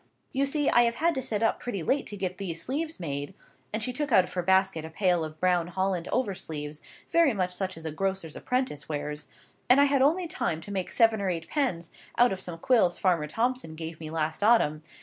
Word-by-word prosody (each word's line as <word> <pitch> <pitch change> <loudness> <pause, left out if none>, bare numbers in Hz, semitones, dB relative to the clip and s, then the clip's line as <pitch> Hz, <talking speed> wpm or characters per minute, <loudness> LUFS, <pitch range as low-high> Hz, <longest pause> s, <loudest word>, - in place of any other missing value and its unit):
You 275 +1 +2
see, 290 0 0
I 240 - +6
have 235 0 0
had 335 +6 +2
to 265 - -2
sit 220 -3 -2
up 225 - +2
pretty 200 -8 -4
late 275 - 0
to 205 - -6
get 185 -1 -3
these 170 -4 -4
sleeves 310 - -3
made"—and 165 +7 -6
she 250 +1 -2
took 295 +1 -2
out 185 - +6
of 180 - -9
her 180 - 0
basket 190 -2 +2
a 160 - -7
pail 175 0 +1
of 155 0 -7
brown 180 -1 +2
holland 185 -1 -1
over 250 -6 0
sleeves, 150 -3 -6 0.3
very 335 -6 +4
much 180 -2 -1
such 185 -1 -3
as 160 - -10
a 160 - -2
grocer's 190 -1 -2
apprentice 250 - -2
wears—"and 150 - -1
I - - +7
had 280 -1 +2
only 330 +7 +3
time 165 - -2
to 205 - -9
make 190 -2 -2
seven 225 -2 +3
or 195 - 0
eight 165 -2 -3
pens, 185 - -1 0.3
out 245 -3 +5
of 190 - -6
some 175 -3 -6
quills 185 -2 +3
Farmer 170 -5 +1
Thomson 230 - -1
gave 160 0 -6
me 155 -1 -6
last 160 +1 -2
autumn. 205 -9 +4
190 Hz, 225 wpm, -28 LUFS, 165-245 Hz, 0.3 s, I